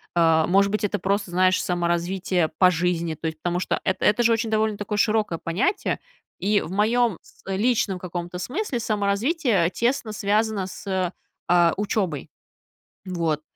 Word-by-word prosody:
А, 165 -2 +4
может 195 +2 +3
быть, 215 - -1
это 205 0 0
просто, 195 0 -1
знаешь, 185 +1 +3
саморазвитие 175 0 0
по 185 -1 +6
жизни, 170 -1 -1
то 160 - -4
есть, 160 0 -4
потому 175 0 -1
что - - -1
эт 190 - 0
это 215 +3 +3
же 235 - +4
очень 225 0 +1
довольно 215 -1 +1
такое 205 +1 -3
широкое 210 -4 +1
понятие, 180 - -1 0.4
и 205 +2 +2
в - - -7
моем 220 +1 +2
с - - -23
личном 205 -1 +1
каком-то 175 0 -5
смысле 265 - -3
саморазвитие 210 - +1
тесно 235 +2 -1
связано 210 -1 0
с, 190 -1 -3 0.4
а, 175 -1 +5
учебой. 190 -7 -2 0.8
Вот. 165 -5 -1
195 Hz, 155 wpm, -24 LUFS, 175-215 Hz, 0.8 s, по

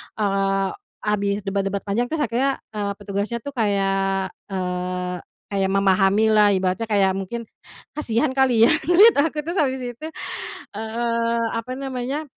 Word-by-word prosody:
eee, 195 -2 +1 0.3
habis 205 -1 0
debat-debat 195 0 -2
panjang 210 +4 0
terus 315 +3 -2
akhirnya, 270 0 0
eee, 205 -1 -1
petugasnya 205 +3 -3
tuh 285 - -6
kayak, 195 -2 +1 0.2
eee, 180 -1 -2 0.3
kayak 195 -1 +1
memahami 195 +2 +3
lah 210 -1 +5
ibaratnya 185 +4 0
kayak 200 -3 +3
mungkin 195 +5 -4 0.6
kasihan 275 0 +1
kali 250 -4 +4
ya - - +5 0.2
menurut 400 +6 +7
aku 305 0 +1
terus 340 +5 -4
habis 265 -3 +1
itu, 245 +3 -6 0.7
eee, 230 +2 -1
apa 230 +2 -3
namanya 270 +2 -3
210 Hz, 135 wpm, -22 LUFS, 195-245 Hz, 0.7 s, menurut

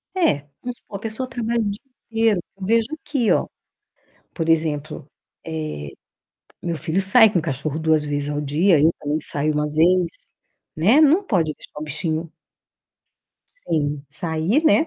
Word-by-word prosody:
É, 350 - +3 0.2
vamos 245 0 -6
supor 200 - -9
a - - -13
pessoa 225 +4 -4
trabalha 235 -2 -1
o 210 - 0
dia 200 +1 -5 0.3
inteiro, 225 -4 +2 0.2
eu 190 - -6
vejo 225 +2 +2
aqui, 265 -8 0
ó. - - +2 0.9
Por 165 -2 -3
exemplo, 155 -3 0 0.4
eh, 155 - -5 0.7
meu 170 -1 -2
filho 160 +4 -1
sai 210 +3 +6
com 175 - +2
cachorro 155 -1 -3
2 160 -1 +2
vezes 145 -1 -2
ao 145 0 -2
dia, 155 +4 +3
eu 155 +3 +5
também 150 +1 -1
saio 150 +1 +2
1 150 0 0
vez, 175 +4 +3 0.7
né. 210 - +5
Não 315 +5 +5
pode 170 - +1
deixar - - -11
o - - -4
bichinho 160 +1 -3 1.2
sem 150 - -2
sair, 160 - 0
né. 315 +1 +4
165 Hz, 155 wpm, -22 LUFS, 155-220 Hz, 1.2 s, sai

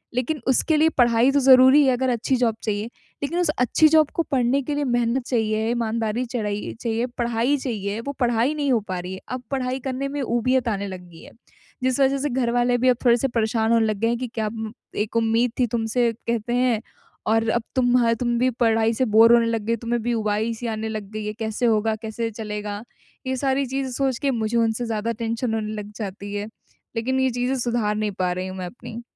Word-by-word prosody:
लेकिन 255 +5 -1
उसके 265 +5 +2
लिए 315 +1 +4
पढ़ाई 240 +1 +4
तो 285 - +3
ज़रूरी 260 +2 +7
है, 260 - +4
अगर 260 +1 0
अच्छी 245 +2 0
जॉब 230 -3 +1
चाहिए। 210 -1 -1 0.4
लेकिन 335 +5 -1
उस 350 -4 +1
अच्छी 250 +5 +4
जॉब 310 -1 +4
को 335 - +1
पढ़ने 255 +1 +2
के 290 +3 -3
लिए 290 - 0
मेहनत 240 0 0
चाहिए, 220 -2 0
ईमानदारी 230 0 -1
चढ़ाई 210 -4 -3
चाहिए, 230 0 -1
पढ़ाई 240 +3 +1
चाहिए, 215 -5 -3
वो 280 - -4
पढ़ाई 240 +2 +2
नहीं 290 -3 -1
हो 240 - +4
पा 185 -1 -2
रही 180 +1 -6
है। 190 - -7
अब 255 0 -4
पढ़ाई 260 -1 -1
करने 265 +1 -2
में 285 0 -3
ऊबियत 250 +1 +1
आने 200 -2 -2
लग 185 -1 -7
गई 165 -1 -14
है, - - -13 0.5
जिस 260 +1 +1
वज़ह 270 0 +3
से 290 +2 -1
घरवाले 245 -1 +1
भी 255 +1 +3
अब 250 - +3
थोड़े-से 240 +2 +4
परेशान 225 -2 0
होने 230 -1 +4
लग 215 -1 -1
गए 230 - +1
हैं 235 +1 +1
कि 250 +1 -4
क्या 215 -1 0 0.5
एक 220 - -10
उम्मीद 230 +1 +2
थी 250 - +4
तुमसे 230 +1 0 0.2
कहते 235 0 -1
हैं 245 -3 +2 0.5
और 225 +1 +2
अब 235 0 0
तुम 250 -1 +3
ह 230 - +3
तुम 240 -1 0
भी 255 +1 +3
पढ़ाई 225 0 +3
से 255 +3 +1
बोर 225 +2 +6
होने 235 -1 +5
लग 230 -1 -1
गई 230 - +1
हो, - - -1
तुम्हें 235 0 -1
भी 240 +1 0
ऊबाई-सी 220 +2 -1
आने 220 0 -3
लग 215 -2 -5
गई 215 -1 -5
है। 210 - -3
कैसे 220 +2 -2
होगा, 220 -1 +2
कैसे 220 +1 -4
चलेगा? 210 -1 -5 0.5
ये 260 - 0
सारी 270 +1 0
चीज़ें 265 0 -3
सोच 260 -1 -1
के 280 - +1
मुझे 225 -1 -1
उनसे 230 +1 +1
ज़्यादा 225 0 -2
टेंशन 230 +1 -2
होने 215 -1 -2
लग 205 0 -10
जाती 200 -1 -6
है। 205 0 -3 0.5
लेक़िन 255 +3 0
ये 260 0 +2
चीज़ें 245 +2 -1
सुधार 235 -3 0
नहीं 210 -1 -1
पा 180 -1 +1
रही 185 +1 -4
हूँ 185 0 -7
मैं 185 - -4
अपनी। 230 +3 -9
235 Hz, 225 wpm, -23 LUFS, 220-255 Hz, 0.5 s, ज़रूरी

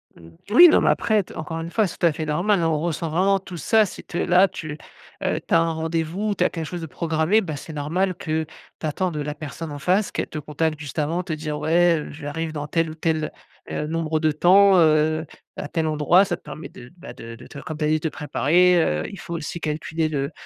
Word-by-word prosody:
Mmh. 85 -1 -15 0.2
Oui, 300 +12 +9
non, 315 - +5
mais - - +3
après 215 -2 +2
t - - -14
encore 165 +1 -4
une 165 +1 -6
fois, 215 0 +2
c'est 180 - -9
tout - - +1
à - - +3
fait 155 +1 -4
normal, 175 +7 +1
hein, 165 - +2
on 155 -2 +1
ressent 165 -1 -2
vraiment 190 +5 +2
tous 185 -1 -9
ça, 215 +8 +3
c'est 190 - -9
te 175 - -6
là 180 +2 +4
tu, 155 -2 -7 0.5
heu, - - 0
tu - - -2
as 165 - +6
un 165 0 +1
rendez-vous, 165 +5 -2
tu - - +1
as - - +3
quelque 165 -2 -5
chose 175 +2 -6
de - - -4
programmé, 160 +6 +1
ah, 155 - -3
c'est 145 +3 -9
normal 170 +6 -1
que 160 -1 -2 0.4
tu - - -5
attends 180 +4 -1
de 150 -2 -4
la 145 0 -3
personne 155 +1 -7
en 145 - -6
face 185 +8 +1
qu'elle - - -2
te - - -7
contacte 155 +1 -2
juste 150 +1 -6
avant, 165 +4 -1
te 180 - -7
dire: 155 -1 -4
«Ouais, 170 +1 +3
heu, 150 - -7
j'arrive 155 +2 -5
dans 150 -1 -5
tel 165 +1 0
ou 155 - -8
tel, 160 -1 -1 0.4
heu, 150 - -2
nombre 160 -1 -1
de 155 0 +2
temps, 190 +5 +6
heu, 155 0 +3 0.3
à - - -5
tel 160 0 -1
endroit». 155 +5 +4
Ça 185 -3 -2
te - - -20
permet 155 - -8
de 120 0 -13
d - - -25
bah, 175 - -10
de 115 0 -9
de 120 +2 -13
te 140 - -10
comme 155 +1 -7
tu 155 - -1
as - - +2
dit, 155 +1 +2
te 160 - -1
préparer, 170 +5 +3
heu, 75 - -1
il 195 - -10
faut 170 - -6
aussi 170 +2 -5
calculer 155 +1 -2
le 140 -1 -2
160 Hz, 260 wpm, -23 LUFS, 150-175 Hz, 0.5 s, Oui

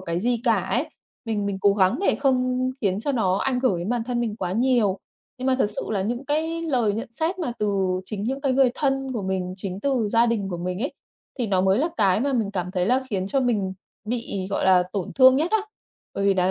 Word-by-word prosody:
cái 170 -2 -2
gì 235 +3 0
cả 230 -2 +4
ấy, 250 - -1 0.4
mình 210 -3 -1
mình 195 -1 -2
cố 200 - +5
gắng 190 -2 +3
để 395 - +2
không 255 -2 +1
khiến 195 -2 0
cho 285 +5 -1
nó 190 -6 +1
ảnh 255 -2 0
hưởng 235 -10 +2
đến 175 +4 -4
bản 240 -2 -1
thân 245 -1 -1
mình 220 -3 -2
quá 185 -4 -3
nhiều. 230 -4 +2 0.4
Nhưng 255 - -3
mà 260 - +3
thật - - +3
sự - - -3
là 195 -3 0
những 240 +6 -3
cái 320 +3 -1
lời 245 -10 +1
nhận 230 +2 -5
xét 330 +8 -2
mà 310 -9 -2
từ 195 -3 0
chính 200 +1 -5
những 270 +3 -2
cái 275 -2 +1
người 260 -1 +4
thân 270 -2 -1
của 225 - -3
mình, 185 -1 -2
chính 190 0 -5
từ 250 -6 0
gia 230 +2 +4
đình 210 -4 -1
của 175 - -3
mình 180 +2 -3
ấy, 280 - -2 0.5
thì 240 - 0
nó 190 -2 +2
mới 190 +3 +3
là 320 +5 +1
cái 195 0 +3
mà 280 +1 0
mình 225 -5 0
cảm 180 -2 -3
thấy 180 -1 0
là 255 +3 +2
khiến 190 -2 -1
cho 270 +6 0
mình 210 -7 0 0.3
bị, 225 -5 -3
gọi - - -1
là, 185 -1 +5
tổn 195 -4 -3
thương 260 0 +7
nhất 320 +5 0
á. 440 - +3 0.6
Bởi 200 - -1
vì 195 - +4
đáng 185 0 +2
225 Hz, 255 wpm, -24 LUFS, 190-260 Hz, 0.6 s, thương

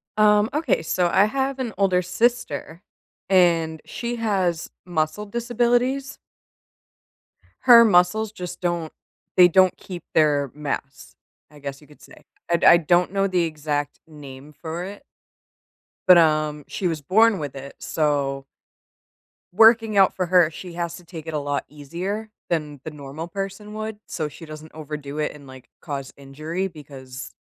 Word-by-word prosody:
Um, 210 0 +4
okay, 300 - +1
so 175 +2 +1
I 195 - +5
have 270 +4 -2
an 240 -4 -3
older 185 -2 +2
sister, 180 -4 -1 0.5
and 165 -4 +3
she 240 0 -4
has 190 -7 -1 0.2
muscle 165 +3 -2
disabilities. 245 +4 0 1.4
Her 240 -3 +9
muscles 200 +3 +3
just 180 -3 -8
don't 175 -3 -2 0.4
they 180 -1 +8
don't 185 +1 +4
keep 180 -2 -9
their 145 -4 +2
mass, 140 -2 -6 0.4
I 150 - -15
guess 140 -1 -6
you 150 - -18
could 150 - -19
say. - - -16 0.3
I 170 0 +2
I - - +9
don't 175 +2 +2
know 195 0 +1
the 180 -2 +1
exact 150 -2 -3
name 145 -2 -12
for 165 +1 -4
it 200 +2 -9 1.0
but, 180 -1 +9
um, 155 -2 +2
she 185 - -2
was 160 -3 -3
born 215 +7 +4
with 145 -5 -6
it, 135 +1 -9
so 140 -3 -1 1.1
working 225 +1 +5
out 195 -1 +5
for 185 - -1
her, 175 -2 +5
she 175 +2 -9
has 170 0 -4
to 175 - -16
take 165 -2 -10
it 160 - -5
a 150 - 0
lot 145 0 -2
easier 180 +9 -5 0.2
than 150 -4 -2
the 160 - -6
normal 150 +2 -8
person 195 +3 -6
would, 215 0 -5
so 155 - -3
she 155 +3 -11
doesn't 155 0 -10
overdo 150 -1 -7
it 150 - -1
and, 140 -2 -14
like, 130 -1 -13
cause 140 -4 -6
injury 155 +7 -4
because 135 -6 -10
170 Hz, 155 wpm, -23 LUFS, 150-200 Hz, 1.4 s, Her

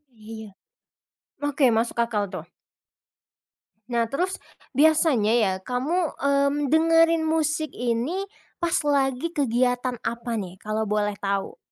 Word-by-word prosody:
Iya. 220 0 -9 1.0
Oke, 280 -2 +3
masuk 235 +1 -1
akal 230 -3 0
tuh. - - -6 1.4
Nah, 235 -2 +1
terus 365 +6 -1 0.4
biasanya 295 -7 +4
ya 195 - +2
kamu, 255 - -1 0.2
mmm, 280 0 +2
dengerin 330 +2 +4
musik 315 -1 0
ini 250 +12 -2 0.3
pas 340 -1 0
lagi 280 +1 +1
kegiatan 250 -3 0
apa 235 +1 -3
nih, 190 -4 -5
kalau 215 +1 -2
boleh 210 -1 0
tahu? 195 0 -2
255 Hz, 115 wpm, -24 LUFS, 225-315 Hz, 1.4 s, biasanya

